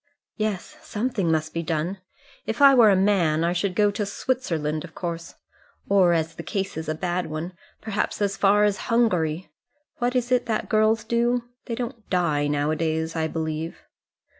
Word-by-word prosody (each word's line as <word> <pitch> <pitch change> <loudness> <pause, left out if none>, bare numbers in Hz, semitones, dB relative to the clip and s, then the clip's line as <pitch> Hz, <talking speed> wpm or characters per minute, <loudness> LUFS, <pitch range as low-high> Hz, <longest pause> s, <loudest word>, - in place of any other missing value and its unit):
"Yes, 215 -4 -3
something 210 -6 -1
must 155 0 -1
be 165 - -1
done. 165 +4 -2 0.5
If 220 +4 -2
I 280 -1 +8
were 235 -4 +7
a 195 - +5
man 185 -5 +2
I 170 +1 +1
should 180 +1 -1
go 205 0 +3
to 210 - -2
Switzerland, 165 - -2
of - - -11
course; 170 -2 -5 0.5
or, 190 -3 +4
as 165 -1 0
the 165 - -7
case 195 +2 -3
is 160 0 -4
a 155 - -1
bad 180 +2 -2
one, 155 +3 -5 0.3
perhaps 210 -1 -2
as 200 -1 0
far 205 +1 +4
as 205 -1 +2
Hungary. 185 -8 +1 0.5
What 245 +1 -1
is 250 0 0
it 250 -1 +2
that 220 -2 -1
girls 215 0 +3
do? 235 +2 +1 0.2
they 230 - -2
don't 235 -2 -6
die 155 -6 +1
now 145 +1 0
a - - 0
days, 160 +1 -1
I 160 -1 0
believe." 160 0 -4
185 Hz, 185 wpm, -24 LUFS, 160-220 Hz, 0.5 s, I